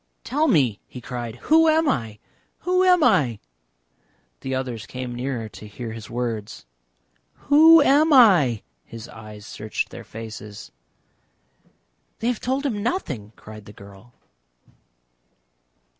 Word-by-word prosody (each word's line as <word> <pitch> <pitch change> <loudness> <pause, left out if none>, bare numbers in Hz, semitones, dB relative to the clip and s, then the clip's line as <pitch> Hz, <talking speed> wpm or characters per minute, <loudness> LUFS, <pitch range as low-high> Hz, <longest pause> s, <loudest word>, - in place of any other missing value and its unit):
"Tell 300 +4 0
me!" 135 - +2
he 125 - -10
cried. 120 -2 -6
"Who 320 +1 +5
am 320 0 +2
I? 115 - -2 0.4
Who 365 +1 +1
am 360 -3 +4
I?" 135 - +3 1.0
The 130 0 -4
others 125 -4 -5
came 125 -1 -6
nearer 120 -2 -4
to 105 - -12
hear 115 +2 -7
his 110 -2 -9
words. 115 - -5 0.8
"Who 315 +2 +8
am 300 +4 +4
I?" 180 - +5 0.2
His 115 0 -10
eyes 105 -1 -12
searched 105 -2 -4
their - - -9
faces. 110 -2 -10 1.5
"They 230 - -1
have 245 - -2
told 265 +3 -2
him 220 -7 -2
nothing!" 140 - -4
cried 110 -1 -12
the 105 - -13
girl. 100 +4 -16
125 Hz, 130 wpm, -23 LUFS, -, 1.5 s, Who